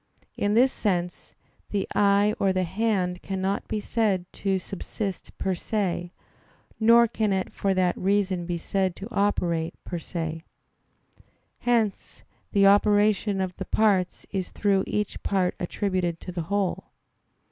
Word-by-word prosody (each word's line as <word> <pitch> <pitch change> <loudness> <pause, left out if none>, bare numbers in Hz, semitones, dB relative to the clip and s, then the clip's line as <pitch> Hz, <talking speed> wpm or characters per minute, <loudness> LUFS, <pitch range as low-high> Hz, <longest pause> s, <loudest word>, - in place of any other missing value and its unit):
In 205 +1 0
this 255 +3 +5
sense, 180 -4 -2 0.3
the 200 -2 -1
eye 205 +1 +4
or 195 - +3
the 185 0 +1
hand 185 -1 -1
cannot 195 +1 -2
be 215 - -2
said 205 -4 0
to 195 -1 0
subsist 195 +1 -5
per 190 - 0
se; 180 -2 -2 0.7
nor 235 +1 +6
can 220 -2 -1
it 190 -1 -1
for 195 -1 0
that 180 -1 +2
reason 190 -2 0
be 175 -1 -1
said 190 +1 -1
to 200 - -7
operate 175 -6 0
per 175 - -4
se. 165 -1 -4 1.2
Hence 230 -4 0 0.3
the 200 -2 +4
operation 205 0 +4
of 185 -1 -2
the - - -4
parts 195 -5 +1
is 190 -2 -2
through 195 -2 +1
each 210 0 -2
part 190 -3 +1
attributed 180 -2 -1
to 180 - -6
the 175 -1 -3
whole. 200 -2 0
195 Hz, 140 wpm, -26 LUFS, 180-205 Hz, 1.2 s, nor